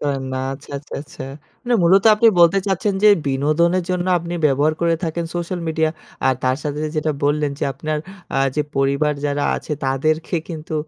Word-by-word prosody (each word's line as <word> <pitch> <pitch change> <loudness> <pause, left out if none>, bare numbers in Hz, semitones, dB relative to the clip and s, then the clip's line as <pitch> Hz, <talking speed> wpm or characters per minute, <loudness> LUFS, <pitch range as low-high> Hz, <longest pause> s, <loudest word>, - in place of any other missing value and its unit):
পারেন 140 -2 -1
না। - - -2 0.2
আচ্ছা, 145 +2 -14
আচ্ছা, 145 - -16
আচ্ছা। 150 -3 -9 0.4
মানে 245 -1 +1
মূলত 190 +3 +5
আপনি 220 +2 +3
বলতে 170 +3 +6
চাচ্ছেন 195 +1 0
যে, 210 - +7 0.2
বিনোদনের 155 +6 +2
জন্য 180 0 -1
আপনি 170 +1 -5
ব্যবহার 145 +2 +2
করে 170 -1 +2
থাকেন 165 +1 -2
সোশ্যাল 175 +1 -3
মিডিয়া 160 0 +1 0.4
আর 130 - +4
তার 130 0 +2
সাথে 150 -1 -3 0.2
যেটা 155 0 0
বললেন 145 0 +1
যে, - - -1
আপনার 155 +3 -3 0.4
আ - - +3 0.2
যে 150 - +2
পরিবার 140 +2 +2
যারা 145 0 -1
আছে - - -5
তাদেরকে 155 +6 0
কিন্তু 160 -1 -6
155 Hz, 180 wpm, -20 LUFS, 145-170 Hz, 0.4 s, যে